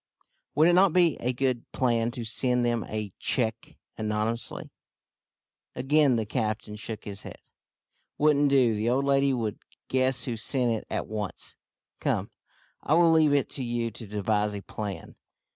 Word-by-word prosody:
"Would 155 +3 +5
it 175 - +5
not 185 -1 +5
be 175 -5 +4
a 125 - 0
good 125 -1 -2
plan 120 -3 +1
to 120 -2 -5
send 125 +2 0
them 120 -2 0
a 105 -3 -5
cheque 115 -2 -2 0.2
anonymously?" 110 +2 -2 1.0
Again 140 +1 +3
the 110 -2 0
captain 110 -1 -2
shook 110 0 -7
his 100 -1 -8
head. - - -9 0.8
"Wouldn't 145 -1 +4
do. 130 -5 +4
The 110 +2 0
old 135 +3 +1
lady 140 0 +3
would 115 -6 -2 0.3
guess 130 -1 +1
who 120 -3 -3
sent 125 +2 0
it 110 - -5
at - - -2
once. 105 -2 -6 0.4
Come, - - -1 0.5
I 155 - +2
will 170 -1 +5
leave 155 -3 +4
it 140 - +2
to 135 - -4
you 120 -1 -2
to 110 +1 -10
devise 105 0 0
a 100 - -5
plan. 105 -2 -6
120 Hz, 160 wpm, -27 LUFS, 110-135 Hz, 1.0 s, Would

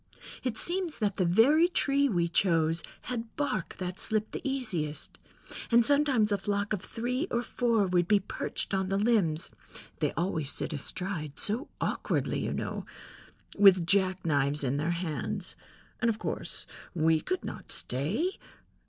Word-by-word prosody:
It 250 -4 -2
seems 350 -2 +1
that 205 -3 -1
the 185 - +2
very 275 - +5
tree 280 -5 +2
we 175 -6 +1
chose 165 -2 +2 0.2
had 230 -2 -5
bark 215 -11 -2
that 180 0 -4
slipped 215 0 0
the - - -5
easiest, 180 - -3 0.5
and 235 -1 +5
sometimes 275 -6 +4
a 200 - +1
flock 205 +1 -1
of 200 - -2
three 250 - -2
or 235 0 0
four 230 -4 +1
would 180 -2 +1
be 210 0 +5
perched 195 - -4
on 190 -1 0
the 195 - +1
limbs 200 -8 +2 0.5
(they - - +1
always 160 -4 -1
sit 155 - -2
astride, 155 0 -4
so 230 +9 0
awkwardly, - - -1
you - - -2
know), - - -3 0.8
with 190 -4 +7
jack 190 0 +2
knives 145 -1 +2
in 135 +1 0
their 155 +3 -1
hands, 170 -2 -3 0.5
and 235 - +3
of 220 - 0
course - - -3 0.3
we 160 -1 +3
could 370 0 -3
not - - -7
stay. 195 - -1
200 Hz, 155 wpm, -29 LUFS, 170-235 Hz, 0.8 s, with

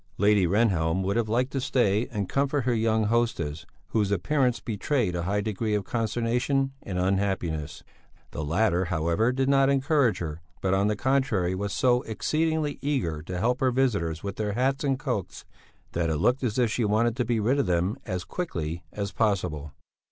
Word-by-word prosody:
Lady 100 -2 +4
Rehnhjelm 95 -3 +2
would 100 +1 0
have 115 -2 0
liked 125 +4 +1
to 135 - -2
stay 115 -4 +1
and 105 -4 -3
comfort 140 +1 0
her 125 0 +1
young 110 -1 +2
hostess, 95 -9 -1 0.2
whose 105 -3 +1
appearance 125 - +1
betrayed 115 - -1
a 85 - -1
high 100 +4 0
degree 110 +1 -1
of 105 - -1
consternation 120 +5 0
and 95 -2 -5
unhappiness. 90 -5 -1 0.5
The 80 - -4
latter, 90 +3 +1
however, 85 +7 +1
did 130 +1 0
not 135 0 +4
encourage 140 - +2
her, 80 -1 -5 0.2
but 95 0 0
on 100 +1 +2
the 105 - +1
contrary 120 -7 +1
was 100 +2 -3
so 125 0 +2
exceedingly 155 +6 -1
eager 125 - -1
to 90 +3 -5
help 120 +6 +1
her 130 - +3
visitors 105 -11 0
with 100 -1 -5
their 105 -1 -1
hats 135 +5 0
and 135 -2 +1
cloaks 125 - -4 0.5
that 85 -1 0
it 80 - 0
looked 125 - +2
as 115 -2 -1
if 120 -3 +2
she 120 - 0
wanted 110 +2 +2
to 125 - +1
be 120 -2 0
rid 125 +7 +2
of 140 - +1
them 90 +4 +1
as 90 -1 -3
quickly 85 - -4
as 100 -1 -4
possible. 80 -9 -1
105 Hz, 185 wpm, -26 LUFS, 90-125 Hz, 0.5 s, Lady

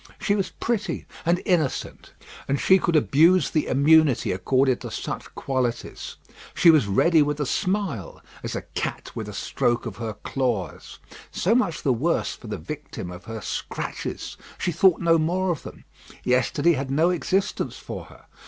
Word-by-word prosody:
She 200 - +1
was 200 -2 0
pretty 215 -7 -2 0.2
and 175 +1 +2
innocent; 160 -7 -1 0.4
and 140 +1 0
she 190 0 +5
could 170 -2 0
abuse 165 +5 +4
the 155 - 0
immunity 145 0 +4
accorded 130 +7 +1
to - - -6
such - - -6
qualities. 125 -3 -3 0.4
She 170 - +7
was 155 -10 +3
ready 160 - +4
with 150 0 0
a 145 - 0
smile, 180 - -2 0.2
as - - -4
a - - -4
cat - - -4
with - - -5
a - - -8
stroke 120 0 -1
of 115 -5 -6
her 115 -2 -4
claws. 120 -4 -3 0.3
So 195 - +1
much 235 -9 +1
the 135 - +3
worse 150 +9 0
for 120 - -12
the 105 - -4
victim 150 -11 -7
of 90 0 -10
her 110 -1 -6
scratches. - - -5 0.2
She 175 - -1
thought 175 +2 +4
no 165 -1 +4
more 180 +4 +1
of 160 - -3
them. - - -11 0.4
Yesterday 130 +6 +2
had 135 -2 -3
no 160 +6 +3
existence 185 +2 -1
for - - -7
her. - - -17
150 Hz, 170 wpm, -24 LUFS, 125-175 Hz, 0.4 s, She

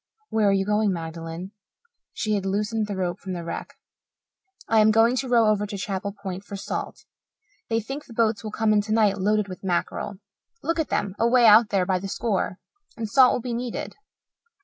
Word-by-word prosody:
"Where 215 -2 +3
are - - +4
you 195 0 +1
going, 210 0 +2
Magdalen?" 165 +1 -6 0.6
She 215 -2 -2
had 200 -2 0
loosened 210 +3 -1
the 205 - -4
rope 180 0 -2
from 190 -1 -6
the 175 -1 -5
wreck. 170 - -6 0.9
"I 225 - +4
am 215 0 +6
going 225 +3 +4
to 260 - -1
row 235 -2 +5
over 210 -1 +2
to 200 - -5
Chapel 195 0 -3
Point 195 -2 -7
for 200 - -8
salt. 195 - -5 0.6
They 225 0 +1
think 270 +7 -6
the 235 - -13
boats 225 -1 +1
will 215 - -4
come 215 0 +1
in 210 - +4
tonight 210 -1 +2
loaded 210 +1 +1
with 185 0 -9
mackerel 190 +2 -2 0.5
look 330 0 -1
at 315 - -1
them 195 - -1
away 235 +1 +4
out 220 +1 +7
there 190 -2 +1
by 185 0 +1
the 195 - -5
score 195 -2 -1 0.4
and 225 -1 -3
salt 255 +3 +6
will - - -1
be 245 0 -4
needed." 240 0 -4
210 Hz, 200 wpm, -25 LUFS, 195-225 Hz, 0.9 s, out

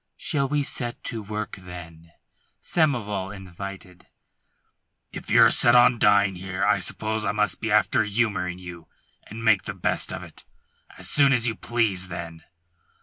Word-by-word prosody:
"Shall 140 -4 -1
we 145 0 0 0.2
get 120 -1 -5
to 115 - -5
work, 105 +1 -6
then?" 85 -2 -12 0.5
Samoval 105 - -1
invited. 95 -1 -10 1.0
"If - - -9
you're 115 +1 +6
set 120 0 +5
on 120 -1 +5
dying 100 -1 +4
here, 95 +1 -3
I - - +2
suppose 110 0 -2
I 100 - -1
must 105 0 -1
be 110 - -2
after 105 +1 +3
humouring 100 -4 -1
you, 90 -2 -11 0.4
and 115 +2 -8
make 110 -4 +3
the - - -6
best - - 0
of - - -6
it. - - -14 0.5
As - - -4
soon 140 -2 +4
as 120 -2 +3
you 115 - 0
please, 110 -6 0
then." 85 -2 -8
105 Hz, 155 wpm, -24 LUFS, 90-115 Hz, 1.0 s, you're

